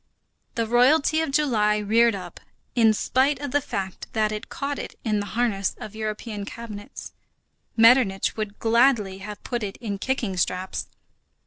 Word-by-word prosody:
The 230 - 0
Royalty 280 +7 +4
of 320 - -1
July 235 -8 +2
reared 225 +2 +3
up, 180 -3 -8 0.3
in 225 -3 +5
spite 260 +5 +1
of 285 -2 -5
the 290 - +2
fact 190 -6 -5
that 215 -1 +1
it 215 0 -6
caught 280 0 -3
it - - -7
in 215 -3 0
the 205 - -4
harness 205 -6 0
of 215 - -8
European 215 -1 -4
cabinets. 210 -1 -9 0.6
Metternich 225 -4 +5
would 215 -2 -4
gladly 225 -4 +2
have 210 +1 -8
put 240 -2 -3
it 200 -2 -5
in 205 -4 -5
kicking 225 -6 -2
straps. 185 +1 -2
220 Hz, 155 wpm, -24 LUFS, 205-250 Hz, 0.6 s, in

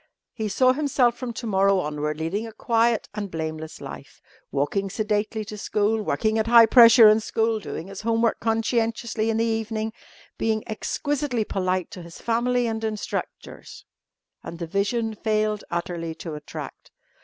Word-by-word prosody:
He 220 -2 -3
saw 255 +5 +4
himself 260 -4 +2
from 245 0 -5
to 235 - -6
morrow 195 -2 +3
onward 150 -2 -2
leading 185 +8 -2
a - - -9
quiet 230 0 +1
and 210 -2 -4
blameless 160 -1 -5
life, - - -10 0.3
walking 195 +8 -1
sedately 215 +1 -1
to 210 0 -8
school, 215 +1 0
working 220 +1 0
at 220 - 0
high 235 -1 +8
pressure 230 -1 +8
in 215 +1 +6
school, 225 0 0
doing 185 - -6
his 195 0 -8
homework 230 +1 +1
conscientiously 225 0 0
in 225 - 0
the 230 - +2
evening, 220 -1 -2 0.5
being 220 -1 0
exquisitely 265 +2 -2
polite 185 -2 -1
to 180 - -8
his 170 0 -11
family 240 +1 +1
and 225 -1 -3
instructors 215 -1 -5 0.6
and 170 - -8
the 170 - -4
vision 210 +6 -1
failed 215 -1 -1
utterly 170 -1 -3
to 165 -1 -7
attract. 150 0 -8
220 Hz, 155 wpm, -24 LUFS, 195-230 Hz, 0.6 s, high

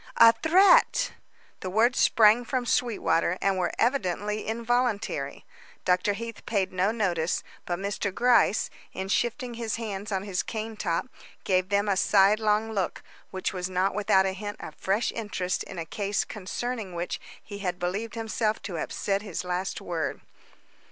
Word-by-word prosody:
"A 230 0 +9
threat!" 375 - +5 0.5
The 185 - -4
words 225 +6 +3
sprang 220 +2 +5
from 250 +1 -2
Sweetwater, 210 -8 +1
and 195 -1 +1
were 180 - 0
evidently 210 -4 0
involuntary. 225 - -1 0.4
Dr. 180 +3 +2
Heath 230 +2 -7
paid 195 -4 0
no 185 +2 +2
notice, 180 -7 0 0.2
but 175 - -1
Mr. 200 +1 -2
Gryce, 240 -1 +3 0.2
in 190 0 -4
shifting 240 +3 0
his 230 -2 -3
hands 210 -2 -5
on 190 -1 -1
his 195 -3 -1
cane 220 0 -5
top, 175 -6 -1 0.4
gave 185 -1 +1
them 200 +1 +2
a 200 - +2
sidelong 210 +3 +3
look 195 -4 -2 0.3
which 190 +1 -3
was 180 -1 -3
not 185 +2 +1
without 190 -1 +3
a 190 - 0
hint 205 +2 -6
of - - -8
fresh 200 +5 0
interest 190 -5 -2
in - - -9
a 165 - -3
case 200 +5 -1
concerning 215 0 -5
which 170 +1 -3 0.2
he 205 -1 -8
had 180 -3 -2
believed 200 +5 -3
himself 220 -1 -1
to 175 -5 -4
have - - -5
said 200 0 -1
his 200 -5 -5
last 180 +1 -3
word. 165 -4 -3
205 Hz, 160 wpm, -27 LUFS, 185-225 Hz, 0.5 s, A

